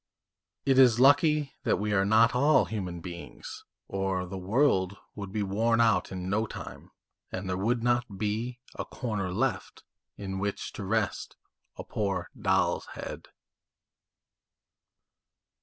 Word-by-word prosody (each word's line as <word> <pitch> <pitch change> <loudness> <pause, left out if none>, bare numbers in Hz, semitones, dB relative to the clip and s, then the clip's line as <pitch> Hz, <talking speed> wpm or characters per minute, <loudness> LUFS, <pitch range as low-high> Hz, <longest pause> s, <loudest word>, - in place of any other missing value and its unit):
It 135 -1 +4
is 120 -3 +6
lucky 145 +1 +4
that - - +1
we 105 0 -1
are 95 -1 +3
not 110 +4 +5
all 145 +5 +4
human 90 -6 -4
beings, 85 0 -9 0.2
or 95 -1 -1
the 90 +2 -7
world 100 -1 +1 0.2
would 100 -2 -7
be 105 0 -1
worn 110 +4 +1
out 115 -1 +3
in 90 -1 -5
no 110 +3 0
time, - - -9 0.4
and 95 +1 -4
there 90 - -1
would 115 +5 0
not 120 -4 0
be 110 +4 -2 0.2
a - - -4
corner 105 -7 -3
left 90 - -2 0.3
in 95 -1 -4
which 100 +1 -3
to - - -6
rest 105 +1 -1 0.4
a - - -6
poor 95 -4 -2
doll's - - +1
head." - - -7
105 Hz, 140 wpm, -28 LUFS, 95-120 Hz, 0.4 s, is